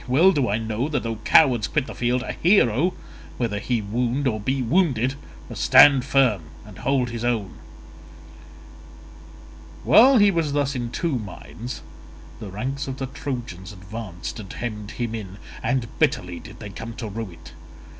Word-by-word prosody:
Well 155 +10 +5
do 140 -9 0
I 105 - +1
know 115 +5 -2
that 150 - -1
though 115 -1 -3
cowards 120 -1 +4
quit 150 -4 0
the - - -8
field, 120 +1 0
a - - -4
hero, 175 - +3 0.4
whether 110 -4 -1
he 115 +1 -1
wound 120 +6 -1
or 110 -3 0
be 130 +5 -1
wounded, 130 - +2 0.3
must - - -6
stand 135 -3 +7
firm 130 -8 +3 0.2
and 105 -3 -12
hold 130 -2 0
his 115 0 -5
own." 110 -7 -2 2.2
While 260 +3 +7
he 205 -2 +6
was 165 -5 -1
thus 145 -1 0
in 120 -3 -3
two 145 +1 -1
minds, 110 +4 -8 0.6
the 105 -3 -7
ranks 130 +9 -4
of 135 0 -5
the 135 - -3
Trojans 120 - -6
advanced 95 0 -7
and 100 -3 -9
hemmed 105 -3 -5
him 115 0 -4
in, 100 -4 -6 0.2
and 120 +1 0
bitterly 90 -1 0
did - - -12
they 105 -2 -8
come 115 +3 -8
to 115 - -5
rue 110 0 -5
it. - - -14
120 Hz, 165 wpm, -23 LUFS, 110-135 Hz, 2.2 s, stand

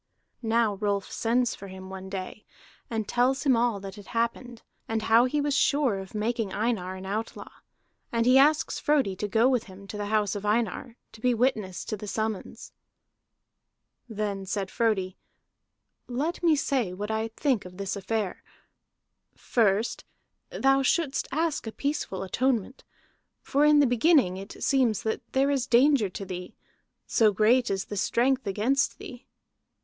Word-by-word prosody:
Now 225 -3 +1
Rolf 200 -1 -1
sends 240 +1 +1
for 200 - -10
him 190 0 -10
one 190 0 -8
day, 190 +2 -6 0.5
and 220 -3 -2
tells 255 +3 +1
him 270 -4 +4
all 230 -3 +1
that 195 +1 -8
had 205 - -12
happened, 235 +1 -3 0.2
and 225 -1 -2
how 225 +2 +5
he 295 +4 0
was 290 0 0
sure 280 -8 +2
of 190 +2 -10
making 220 -1 -1
Einar 205 -4 -1
an 190 0 -8
outlaw. 215 +4 -5 0.6
And 230 -1 +1
he 255 +2 +6
asks 300 +2 +3
Frodi 280 -10 +1
to 210 - -2
go 225 +4 +3
with 255 -3 +1
him 195 0 -13
to 210 - -7
the 205 - -3
house 210 -2 +1
of 205 - -5
Einar, 225 +2 -1
to 220 - -15
be 250 0 +2
witness 220 -7 -1
to - - -3
the 210 0 -8
summons. 215 0 -4 1.4
Then 205 -3 -3
said 195 -1 -3
Frodi: 200 -5 0 0.9
"Let 285 +8 -2
me 330 -3 +4
say 265 - 0
what 205 +3 -4
I 220 +1 -1
think 230 0 0
of 180 0 -12
this 195 -1 -3
affair. 205 -1 -3 0.9
First 220 -1 +1 0.5
thou 270 0 +2
shouldst 285 +1 0
ask 315 -4 -1
a - - -3
peaceful 280 -9 -3
atonement. 250 +4 -1 0.6
For 285 +2 +2
in 300 0 +6
the 290 - +6
beginning 245 - +3
it 195 +2 -8
seems 240 -5 +2
that 220 -1 -2
there 275 +1 +3
is 270 -2 0
danger 250 -3 +4
to 195 +2 -7
thee, 180 -1 -7 0.5
so 220 -2 +3
great 235 +5 +3
is 195 0 -1
the 205 - -6
strength 255 +4 +1
against 220 +8 +1
thee. 295 -12 -11
225 Hz, 165 wpm, -27 LUFS, 200-260 Hz, 1.4 s, he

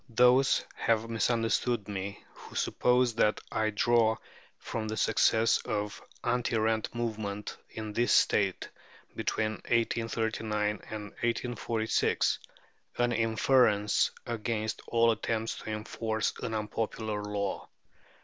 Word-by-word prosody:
Those 125 +3 +4
have 115 0 0
misunderstood 115 -1 +1
me 100 -1 -5
who - - -13
suppose 125 -1 +2
that 110 -1 +2
I 110 0 +1
draw 110 +1 +3 0.4
from 110 -2 -4
the 110 0 -3
success 115 +1 +3
of 105 0 -3 0.2
the 120 - -1
anti 120 -1 +1
rent 110 +1 0
movement 105 -3 -3
in 110 -1 -6
this 120 +3 +2
State 100 -3 +3 0.5
between 110 0 0
1839 115 -2 0 0.2
and 110 -1 -5 0.2
1846 115 -1 0 0.6
an 120 0 +2
inference 110 -2 +3 0.2
against 110 -1 -2
"all 115 0 +4
attempts 110 0 -2
to - - -8
enforce 110 0 -2
an 110 - -3
unpopular 110 0 -2
law." 100 -1 -3
110 Hz, 110 wpm, -30 LUFS, 105-115 Hz, 0.6 s, Those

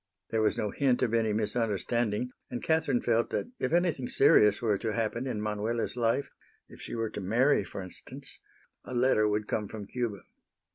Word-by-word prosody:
There 110 - +1
was 110 - +2
no 105 - -1
hint 130 -3 +1
of 115 -3 0
any 115 -2 +2
misunderstanding, 110 +2 -1 0.2
and 120 - -5
Catherine 160 -6 +1
felt 115 0 +1
that 240 - -3
if - - -1
anything 170 -7 +1
serious 105 -1 +5
were 105 -4 +1
to 110 -2 -2
happen 115 +3 -1
in 120 -5 -2
Manuela's 110 +3 -2
life, 120 +3 0 0.4
if - - -14
she - - -6
were 115 -1 -2
to 105 - -5
marry, 115 +6 +3
for 95 +1 -7
instance, 90 - -10 0.4
a 125 - -7
letter 120 -3 +3
would 105 0 -1
come 105 -1 -1
from 105 0 -7
Cuba. 115 -4 -3
115 Hz, 185 wpm, -29 LUFS, 105-125 Hz, 0.4 s, serious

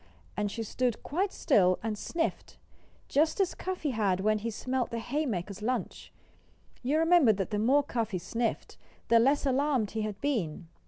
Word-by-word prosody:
And 210 0 -1
she 230 - -4
stood 240 +1 -1
quite 380 +6 -1
still, 185 - +3
and 220 -1 -1
sniffed, 330 +10 -3 0.5
just 310 +6 +2
as 385 -3 +2
Cuffy 365 -6 -3
had 200 -6 +1
when 215 +1 +2
he 230 +2 -3
smelled 255 +3 -2
the 235 - -4
haymakers' 220 - -3
lunch. 250 +4 -3 0.7
You 275 +5 +1
remember 325 -7 +5
that 195 0 -3
the 210 - 0
more 270 +7 +4
Cuffy 230 -7 -2
sniffed, 225 +6 -3 0.3
the 230 - +6
less 275 +5 +3
alarmed 270 -4 +1
he 220 - -2
had 215 -2 -4
been. 180 - -2
235 Hz, 165 wpm, -29 LUFS, 210-285 Hz, 0.7 s, the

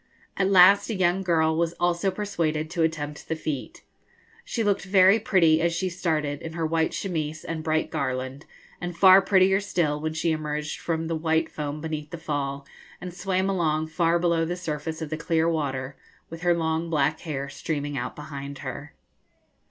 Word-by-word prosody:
At 195 0 +1
last 195 +2 +6
a 225 - -1
young 185 0 +2
girl 160 -3 +2
was 170 +1 0
also 175 +2 +1
persuaded 165 -6 -2
to 170 -1 -1
attempt 150 -2 -2
the 160 - -1
feat. 155 -4 -5 0.6
She 255 - -2
looked 205 -2 +1
very 195 +2 +5
pretty 165 -7 +3
as 170 0 +1
she 185 +2 -1
started, 155 -5 -2
in 160 - -7
her 165 -1 -2
white 160 0 +1
chemise 155 -5 -3
and 160 -1 -4
bright 155 0 0
garland, 130 +3 -3 0.3
and 175 -1 -4
prettier 190 0 +6
still 170 -7 -1
when 155 0 -2
she 160 +1 0
emerged 150 -1 -3
from 165 -1 -2
the 165 0 -2
white 160 0 0
foam 150 0 -4
beneath 155 -2 -4
the 170 - -6
fall, 140 -3 -3 0.3
and 180 -1 -7
swam 190 0 -1
along 160 -5 0
far 165 +1 +2
below 170 -1 +1
the 175 +2 -2
surface 160 -2 -4
of 155 - -7
the 155 - -2
clear 165 0 +1
water, 140 -4 -2 0.4
with 165 0 -8
her 175 -1 +3
long 160 0 -1
black 150 -1 +1
hair 140 -4 -4
streaming 145 -1 -4
out 125 -1 -4
behind 140 -2 -7
her. 145 +3 -7
160 Hz, 180 wpm, -25 LUFS, 150-175 Hz, 0.6 s, last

